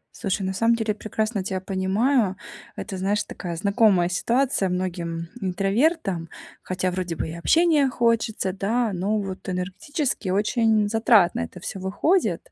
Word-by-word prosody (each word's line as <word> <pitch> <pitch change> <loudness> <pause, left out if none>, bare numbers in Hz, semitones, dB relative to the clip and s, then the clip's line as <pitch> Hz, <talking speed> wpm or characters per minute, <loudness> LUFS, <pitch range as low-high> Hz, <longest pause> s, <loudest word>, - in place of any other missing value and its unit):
Слушай, 195 -2 -2
на 190 0 -2
самом 230 +4 +3
деле 225 -2 -1
я - - -3
прекрасно 215 -1 -2
тебя 190 0 -2
понимаю. 195 +3 +1 0.4
Это, 195 -3 -6
знаешь, 205 +2 0
такая 175 -2 -6
знакомая 200 -1 +3
ситуация 235 +2 +1
многим, 170 -2 -3
интровертам, 195 - 0 0.3
хотя 185 0 -2
вроде 180 -2 -3
бы - - -3
и 160 - -6
общения 300 - +3
хочется, 230 -6 0
да. 220 +3 0
Но 195 +4 0
вот 195 -1 -6
энергетически 195 - -3
очень 215 +2 +2
затратно 220 -4 +4
это 85 - -5
всё 195 - -6
выходит. 200 - 0
200 Hz, 145 wpm, -24 LUFS, 185-230 Hz, 0.4 s, затратно